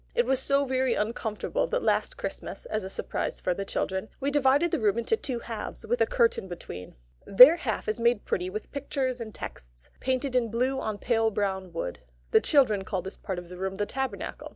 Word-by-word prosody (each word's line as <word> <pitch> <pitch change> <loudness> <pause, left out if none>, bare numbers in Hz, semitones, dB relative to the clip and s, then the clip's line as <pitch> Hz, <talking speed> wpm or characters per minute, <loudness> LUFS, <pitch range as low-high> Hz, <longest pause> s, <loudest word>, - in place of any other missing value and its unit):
It 480 - +3
was 265 -1 +2
so 280 +1 +3
very 260 -2 +1
uncomfortable 225 - -1
that - - -1
last - - +1
Christmas, - - -5
as 215 -1 -2
a 190 - -5
surprise - - -3
for 180 - 0
the 195 - -4
children, 190 +1 -2
we 280 +1 0
divided 290 +4 +3
the - - +1
room 215 -1 +2
into 235 - +1
two 280 - -3
halves 230 -2 -6
with 235 +2 0
a 225 - +4
curtain 230 -4 +2
between. 90 - -8 0.3
Their 255 - +9
half 225 -10 -3
is 215 +3 -1
made 235 -2 +2
pretty 180 0 -1
with 215 +3 -6
pictures 265 -3 -2
and 220 -1 -6
texts, - - -9
painted 260 0 -1
in 240 -2 +2
blue 255 +4 0
on 215 -4 -3
pale 225 0 +2
brown 190 -3 -2
wood. 125 - -4 0.3
The - - +6
children 230 -9 +3
call 190 -2 -3
this 190 - -6
part 190 -3 -4
of 175 0 -7
the 180 - -9
room 190 +1 -3
the 205 +1 -1
Tabernacle. 265 +4 -4
225 Hz, 210 wpm, -28 LUFS, 195-265 Hz, 0.3 s, Their